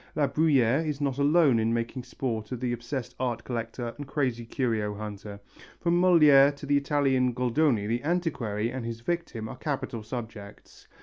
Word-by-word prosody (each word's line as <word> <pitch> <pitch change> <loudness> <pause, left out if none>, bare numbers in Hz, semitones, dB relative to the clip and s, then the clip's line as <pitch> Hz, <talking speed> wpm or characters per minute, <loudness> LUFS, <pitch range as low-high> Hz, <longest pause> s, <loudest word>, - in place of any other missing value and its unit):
La 150 - +2
Bruyère 140 -3 +2
is 150 -3 -3
not 140 -2 -1
alone 145 -4 +4
in 110 +1 +1
making 115 +2 -3
sport 120 -3 -4
of 125 - -4
the 125 -1 -1
obsessed 120 +2 -5
art 120 -3 -2
collector 115 0 -4
and 145 - -6
crazy 125 -5 -2
curio 110 -5 -1
hunter. 105 -1 -7 0.4
From 175 +1 +2
Molière 145 -6 +6
to 140 - -9
the 145 +1 +2
Italian 135 -3 +2
Goldoni 125 -2 +1
the 115 +3 -1
antiquary 135 - -1
and 130 -1 -5
his 115 0 -5
victim 145 -7 -3
are - - -8
capital 130 -5 -3
subjects. 110 -3 -9
125 Hz, 170 wpm, -27 LUFS, 115-145 Hz, 0.4 s, Molière